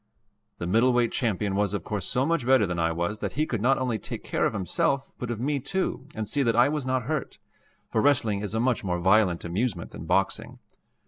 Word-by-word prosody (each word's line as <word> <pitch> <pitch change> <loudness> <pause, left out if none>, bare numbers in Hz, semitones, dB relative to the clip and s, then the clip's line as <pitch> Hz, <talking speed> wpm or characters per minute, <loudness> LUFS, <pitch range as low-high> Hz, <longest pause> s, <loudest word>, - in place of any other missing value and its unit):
The 85 - -4
middleweight 120 +5 +3
champion 105 -4 0
was 100 0 +1
of 95 - -3
course 105 -4 -3
so 130 +2 +1
much 165 -3 +1
better 130 -3 +4
than 90 -2 -3
I 80 0 +2
was 85 +6 -2
that 100 -2 -3
he 155 +3 +1
could 115 -8 -3
not 135 +4 +3
only 125 -4 -1
take - - -6
care - - +1
of - - -4
himself 135 - 0
but 125 - -4
of 120 -2 -3
me 140 +3 0
too 185 -2 -3
and 110 -1 -3
see 140 +6 0
that 115 -4 +2
I 120 +3 +5
was 150 -3 -2
not 130 -1 0
hurt 150 +3 -3 0.5
for 110 - +2
wrestling 115 -7 +3
is 105 +1 -4
a - - +1
much 125 -1 +1
more 90 -2 -1
violent 95 -1 +3
amusement 90 0 -2
than - - -8
boxing. - - 0
115 Hz, 225 wpm, -26 LUFS, 100-130 Hz, 0.5 s, I